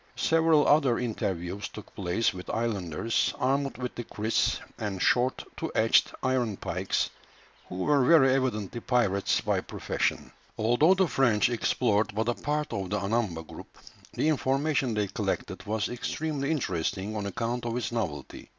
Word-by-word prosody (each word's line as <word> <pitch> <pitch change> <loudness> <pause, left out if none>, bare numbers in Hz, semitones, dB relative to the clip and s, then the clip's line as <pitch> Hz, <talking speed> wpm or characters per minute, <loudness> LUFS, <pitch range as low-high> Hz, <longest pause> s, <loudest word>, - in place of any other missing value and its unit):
Several 160 -2 +3
other 140 -5 +4
interviews 100 -5 -3
took 105 - -11
place 95 +4 0
with 90 0 -9
islanders, 110 -2 -1
armed 135 +1 0
with 125 -1 -4
the 120 - -5
kriss, 110 0 0 0.2
and 105 -4 -3
short 125 +6 +2
two - - -4
edged - - +4
iron 125 -6 0
pikes, - - -1 0.6
who - - -7
were 135 +9 +2
very 135 -2 +6
evidently 120 -4 -1
pirates 105 -6 +1
by - - 0
profession. - - -2 0.3
Although 120 +11 +4
the 190 -1 +3
French 120 -8 +3
explored 110 -3 +1
but 110 +2 0
a - - +2
part 150 +4 -2
of 95 -2 -3
the 105 - 0
Anamba 100 -5 -1
group, - - -12 0.4
the - - 0
information 135 -3 +1
they 105 -1 +1
collected 95 - -3
was 110 0 0
extremely 140 +3 -3
interesting 95 - -2
on 105 -1 -3
account 120 +4 -3
of 115 +1 -2
its 125 - -2
novelty. 75 - -4
115 Hz, 150 wpm, -28 LUFS, 100-135 Hz, 0.6 s, very